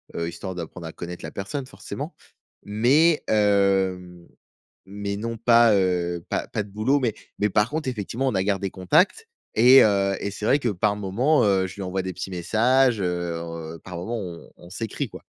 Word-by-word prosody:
heu, 85 - -2
histoire 90 +2 -7
d'apprendre 85 0 -7
à - - -7
connaître 90 0 -8
la - - -7
personne 130 +8 -5
forcément - - -7 0.5
mais 135 +10 +3
hem, 95 -4 +1 0.6
mais 100 +1 -5
non 115 +1 -4
pas, 115 -1 +5
heu, 90 -3 0
pas - - -1
pas - - -2
de 100 - -14
boulot 115 +8 +1
mais 120 -5 -1 0.2
mais 105 - +2
par 105 +3 +2
contre, 155 -3 -2
effectivement, 120 +3 -3
on 120 - 0
a 95 - +1
gardé 100 -1 -1
contact 165 - +2 0.3
et 125 +4 +8
heu 100 -2 +2
et 100 - -3
c'est 105 +1 -6
vrai 140 +5 +4
que 125 - -1
par 105 +1 0
moment, 110 +10 +1
heu, 95 -2 +2
je 95 - -10
lui 100 - -7
envoie 95 0 -2
des 95 0 -4
petits 95 +2 -6
messages, 115 +6 +2
heu, 85 -2 -4
par 90 -2 -7
moment, 115 +7 -4
on 90 -4 -8
on 85 - -14
s'écrit, 110 +1 -4
quoi. - - -11
100 Hz, 190 wpm, -24 LUFS, 90-115 Hz, 0.6 s, et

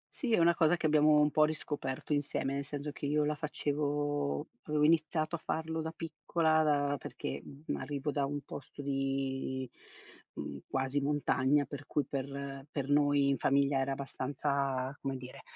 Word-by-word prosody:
Sì, 250 -5 -2
è - - +5
una 170 0 +5
cosa 170 +1 +3
che 170 - -3
abbiamo 150 0 +5
un 150 0 +4
po' 155 - +5
riscoperto 150 -3 -2
insieme, 145 -1 0
nel 140 - -1
senso 145 +1 -4
che 145 - -4
io 150 +1 +2
la 150 - +1
facevo 145 -1 -1 0.2
avevo 150 -1 +1
iniziato 155 +1 +3
a 165 - -6
farlo 160 0 -2
da 160 - -3
piccola, 160 0 +1
da 145 -2 +2
perché, - - -5
mhmm, 140 +3 -5
arrivo 145 +2 -2
da 140 -1 0
un 145 +1 -1
posto 145 +1 -8
di, 135 -1 -1 0.7
mhmm, 70 - -5
quasi 135 +1 0
montagna, 145 -1 +2
per 145 0 -8
cui 145 - 0
per 140 0 -4
per 140 -2 -3
noi 145 -1 +4
in 140 - +2
famiglia 140 0 +3
era 135 +1 0
abbastanza, 135 0 -1
come 135 -1 -2
dire, 125 0 -10
145 Hz, 170 wpm, -32 LUFS, 135-150 Hz, 0.7 s, è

